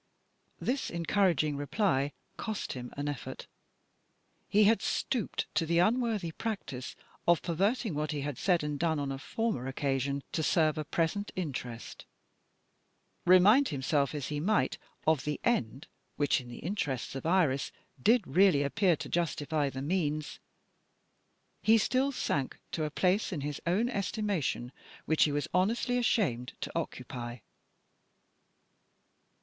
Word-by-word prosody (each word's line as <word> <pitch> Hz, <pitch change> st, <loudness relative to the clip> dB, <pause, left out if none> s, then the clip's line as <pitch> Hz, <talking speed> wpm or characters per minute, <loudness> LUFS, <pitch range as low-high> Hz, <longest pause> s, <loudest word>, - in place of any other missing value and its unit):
This 265 Hz, +2 st, -1 dB
encouraging 170 Hz, -3 st, +1 dB
reply 145 Hz, -2 st, +1 dB, 0.2 s
cost 220 Hz, -2 st, -4 dB
him 125 Hz, -1 st, -7 dB
an 145 Hz, +1 st, -2 dB
effort. 145 Hz, -4 st, -5 dB, 1.0 s
He 210 Hz, +1 st, +5 dB
had 220 Hz, +2 st, +4 dB
stooped 240 Hz, -6 st, -1 dB
to -, -, +2 dB
the 170 Hz, +1 st, +2 dB
unworthy 215 Hz, -2 st, +2 dB
practice 160 Hz, -, -5 dB, 0.3 s
of 170 Hz, -1 st, +4 dB
perverting 200 Hz, +5 st, 0 dB
what 150 Hz, +1 st, -2 dB
he 145 Hz, -2 st, -2 dB
had 145 Hz, -3 st, -4 dB
said 175 Hz, -5 st, +2 dB
and 150 Hz, -1 st, -3 dB
done 165 Hz, -2 st, +1 dB
on 140 Hz, -1 st, -2 dB
a 135 Hz, -, -4 dB
former 180 Hz, -, -2 dB
occasion, 135 Hz, 0 st, -1 dB
to 160 Hz, -, -1 dB
serve 155 Hz, -1 st, +2 dB
a -, -, -1 dB
present 170 Hz, +6 st, -1 dB
interest. 130 Hz, -9 st, -5 dB, 1.2 s
Remind 205 Hz, +10 st, +7 dB
himself 140 Hz, 0 st, 0 dB
as 145 Hz, -3 st, -3 dB
he 150 Hz, -1 st, -2 dB
might 210 Hz, +8 st, +1 dB, 0.3 s
of 160 Hz, -3 st, +3 dB
the 150 Hz, 0 st, -2 dB
end 135 Hz, -, 0 dB, 0.3 s
which, 145 Hz, -1 st, +2 dB
in 125 Hz, -, -12 dB
the 120 Hz, -, -8 dB
interests 150 Hz, -, -3 dB
of 135 Hz, +4 st, -4 dB
Iris, 165 Hz, -7 st, +2 dB, 0.3 s
did 225 Hz, -, +4 dB
really 170 Hz, 0 st, +4 dB
appear 175 Hz, +5 st, +2 dB
to -, -, -7 dB
justify 155 Hz, -3 st, 0 dB
the 135 Hz, 0 st, -5 dB
means, 155 Hz, -2 st, -1 dB, 1.2 s
he 225 Hz, +1 st, +6 dB
still 260 Hz, +5 st, +2 dB
sank 140 Hz, -, -1 dB
to 155 Hz, -, -1 dB
a -, -, -2 dB
place 185 Hz, +8 st, +1 dB
in 160 Hz, -6 st, -3 dB
his 145 Hz, +1 st, -4 dB
own 200 Hz, +8 st, +2 dB
estimation 200 Hz, -, -1 dB, 0.3 s
which 160 Hz, -, +4 dB
he 150 Hz, -, 0 dB
was 145 Hz, 0 st, -1 dB
honestly 230 Hz, +6 st, +2 dB
ashamed 160 Hz, -, +1 dB
to -, -, -4 dB
occupy. 120 Hz, 0 st, -4 dB
160 Hz, 140 wpm, -31 LUFS, 140-200 Hz, 1.2 s, Remind